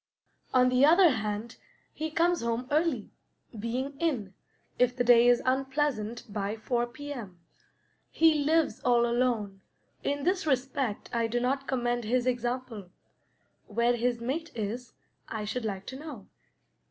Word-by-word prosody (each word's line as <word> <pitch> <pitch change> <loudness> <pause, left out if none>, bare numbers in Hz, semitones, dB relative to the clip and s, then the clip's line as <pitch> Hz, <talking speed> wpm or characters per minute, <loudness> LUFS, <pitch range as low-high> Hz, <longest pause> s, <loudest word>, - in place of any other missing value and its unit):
On 255 -1 +5
the 250 +1 +3
other 340 +3 +7
hand, 215 0 -3 0.4
he 315 +1 -3
comes 340 +2 +2
home 235 +2 -2
early, 300 -7 +1 0.5
being 255 +6 -3
in, 245 - -1 0.5
if 250 0 +3
the 250 - +1
day 240 0 +6
is 245 0 +4
unpleasant, 265 -3 0
by 205 0 -3
four 240 +2 -1
P.M. 240 - -8 0.7
He 325 -1 +4
lives 320 +1 +2
all 240 -1 +3
alone; 235 -5 0 0.4
in 285 0 -1
this 365 0 0
respect 265 -4 -1
I 230 -1 +1
do 240 +2 -1
not 270 +3 -1
commend 240 -2 -1
his 245 +2 +1
example. 245 -5 -2 0.8
Where 235 +3 +2
his 240 0 0
mate 290 +8 -3
is, 230 +3 -4 0.3
I 215 -1 -4
should 225 +3 -3
like 195 -3 -4
to 260 - -7
know. 285 -10 -8
245 Hz, 140 wpm, -29 LUFS, 230-275 Hz, 0.8 s, other